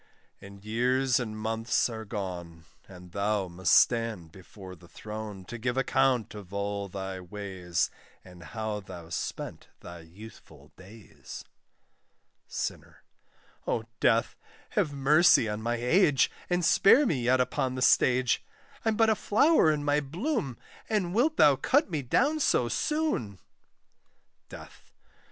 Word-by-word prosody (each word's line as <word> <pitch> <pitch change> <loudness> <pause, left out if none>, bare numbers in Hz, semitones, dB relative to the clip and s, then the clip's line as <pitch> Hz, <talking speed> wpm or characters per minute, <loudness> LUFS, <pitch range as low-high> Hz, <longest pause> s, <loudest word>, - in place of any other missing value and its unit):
And 100 0 -13
years 125 +4 +1
and 110 -3 -5
months 115 +2 0
are 110 -2 -7
gone, 90 -6 -6 0.2
And 90 -2 -13
thou 100 0 -1
must 85 0 0
stand 115 -9 +2
before 95 +1 -12
the 85 0 -18
throne, 105 -1 -8
To 120 +4 -8
give 120 +2 -2
account 130 -3 +1
of 100 -3 -11
all 100 0 -3
thy 95 0 -6
ways, 95 -2 -3 0.3
And 90 -2 -14
how 110 +5 -4
thou 90 -4 -11
spent 85 - -5
thy 85 0 -10
youthful 95 +7 -15
days. 100 +3 -12 1.0
SINNER. - - -6 0.6
O 110 - -1 0.2
Death! 115 -1 +2 0.4
have 150 - 0
mercy 145 -1 +4
on 105 0 -4
my 120 +2 -1
age, 135 +4 +3 0.2
And 175 -1 +1
spare 270 - +5
me 150 - 0
yet 125 +2 +2
upon 130 0 -1
the 130 - -1
stage: 125 -3 +3 0.4
I'm 225 -1 +1
but 225 -1 +4
a - - +2
flower 215 - +3
in 150 -1 -2
my 145 0 +2
bloom, 160 - -3 0.3
And 195 -5 0
wilt 285 +9 +2
thou 145 -2 +6
cut 285 - +1
me 155 -3 -1
down 280 - +1
so 125 - +2
soon! 295 - -1 1.1
DEATH. - - -13
115 Hz, 135 wpm, -28 LUFS, 100-140 Hz, 1.1 s, thou